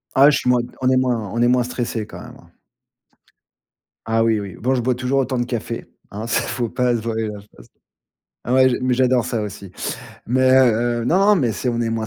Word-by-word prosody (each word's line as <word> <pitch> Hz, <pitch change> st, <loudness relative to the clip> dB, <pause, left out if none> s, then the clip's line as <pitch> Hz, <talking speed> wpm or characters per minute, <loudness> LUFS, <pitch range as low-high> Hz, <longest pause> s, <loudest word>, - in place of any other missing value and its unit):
Ah, 140 Hz, +2 st, +7 dB
je 150 Hz, -, +2 dB
suis 125 Hz, -, -1 dB
moins 125 Hz, -1 st, +3 dB, 0.2 s
on 130 Hz, -, +2 dB
est 130 Hz, -, +3 dB
moins 120 Hz, -5 st, 0 dB
on 115 Hz, -, -1 dB
est 120 Hz, -, +4 dB
moins 125 Hz, 0 st, +3 dB
stressés 120 Hz, -3 st, -3 dB
quand -, -, -11 dB
même, -, -, -12 dB
hein. -, -, -20 dB, 1.6 s
Ah 115 Hz, 0 st, +1 dB
oui, 110 Hz, -1 st, +2 dB
oui. 100 Hz, -3 st, -7 dB
Bon, 130 Hz, +4 st, 0 dB
je 125 Hz, -, 0 dB
bois 125 Hz, +1 st, 0 dB
toujours 130 Hz, +2 st, 0 dB
autant 130 Hz, -1 st, -1 dB
de 120 Hz, -, 0 dB
café, 120 Hz, -1 st, -4 dB, 0.3 s
hein. 105 Hz, +3 st, -6 dB
Ça, 115 Hz, -, +1 dB
faut 120 Hz, -2 st, -3 dB
pas 125 Hz, +1 st, 0 dB
se 115 Hz, -, -3 dB
voiler 110 Hz, 0 st, -2 dB
la 105 Hz, -1 st, -7 dB
face. 100 Hz, -12 st, -18 dB, 0.8 s
Ouais, 130 Hz, +1 st, +4 dB
j'ai 120 Hz, -, -1 dB
mais 130 Hz, 0 st, 0 dB
j'adore 125 Hz, -1 st, +2 dB
ça, 115 Hz, -2 st, -2 dB
aussi. 100 Hz, -2 st, -8 dB, 0.6 s
Mais, 130 Hz, +2 st, +2 dB
heu, 120 Hz, -2 st, +3 dB
non, 195 Hz, +8 st, +4 dB
mais 130 Hz, -, +1 dB
c'est 110 Hz, +5 st, -3 dB
on 120 Hz, 0 st, -1 dB
est 115 Hz, -, -1 dB
moins 115 Hz, -1 st, -2 dB
120 Hz, 230 wpm, -20 LUFS, 115-130 Hz, 1.6 s, Ah